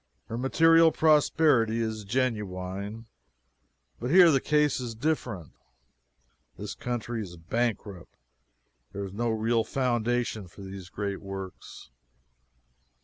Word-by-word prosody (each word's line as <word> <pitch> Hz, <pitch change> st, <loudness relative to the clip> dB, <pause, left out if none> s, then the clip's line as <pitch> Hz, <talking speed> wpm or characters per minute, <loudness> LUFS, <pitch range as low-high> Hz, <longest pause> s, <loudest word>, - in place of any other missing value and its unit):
Her 115 Hz, -, -4 dB
material 165 Hz, +5 st, +5 dB
prosperity 150 Hz, -7 st, +3 dB
is 110 Hz, -2 st, -3 dB
genuine. 105 Hz, -2 st, -3 dB, 0.9 s
But 125 Hz, -, -3 dB
here 175 Hz, +1 st, +7 dB
the 135 Hz, -3 st, +2 dB
case 150 Hz, -2 st, +2 dB
is 120 Hz, -3 st, -5 dB
different. 115 Hz, -, -2 dB, 1.1 s
This -, -, -6 dB
country 120 Hz, -1 st, -4 dB
is 85 Hz, -4 st, -8 dB
bankrupt. 100 Hz, 0 st, -3 dB, 0.8 s
There 100 Hz, 0 st, -4 dB
is 95 Hz, -, -9 dB
no 120 Hz, +3 st, -1 dB
real 115 Hz, +1 st, +1 dB
foundation 120 Hz, -4 st, -1 dB
for 90 Hz, -, -14 dB
these 95 Hz, -1 st, -9 dB
great 100 Hz, -1 st, -4 dB
works. 95 Hz, -7 st, -9 dB
115 Hz, 110 wpm, -27 LUFS, 100-130 Hz, 1.1 s, here